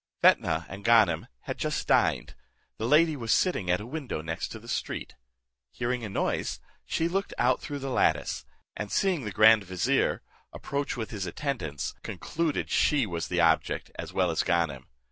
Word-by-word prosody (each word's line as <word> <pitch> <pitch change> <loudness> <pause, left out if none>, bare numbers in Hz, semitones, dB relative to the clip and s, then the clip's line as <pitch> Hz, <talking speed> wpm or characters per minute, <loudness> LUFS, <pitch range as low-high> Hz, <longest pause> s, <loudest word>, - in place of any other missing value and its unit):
Fetnah 80 0 +4
and 95 +1 -9
Ganem 105 -8 +4
had - - -6
just - - -2
dined: - - +2 0.5
the 110 - -1
lady 155 +3 +5
was 115 -5 -3
sitting 100 - +2
at 90 - +3
a 105 - -7
window 130 - -5
next 80 +7 -4
the 115 - -15
street; - - -3 0.6
hearing 120 - -2
a 110 - -4
noise, 95 - -1 0.3
she 165 - 0
looked 195 +3 -2
out 125 +1 +2
through 145 - -5
the 135 -1 -4
lattice, - - +1 0.3
and 105 -1 -5
seeing 180 - +1
the 105 - -3
grand 110 +1 +6
vizier, 90 -2 0 0.3
approach 140 -1 -3
with 110 -2 -4
his 100 -4 -4
attendants, 85 - -3
concluded 165 -2 -2
she 145 -5 +3
was 85 -5 -3
their 90 -1 +1
object 80 -1 +1
as - - -7
well - - +1
as - - +1
Ganem. 80 -7 0
110 Hz, 170 wpm, -28 LUFS, 90-140 Hz, 0.6 s, grand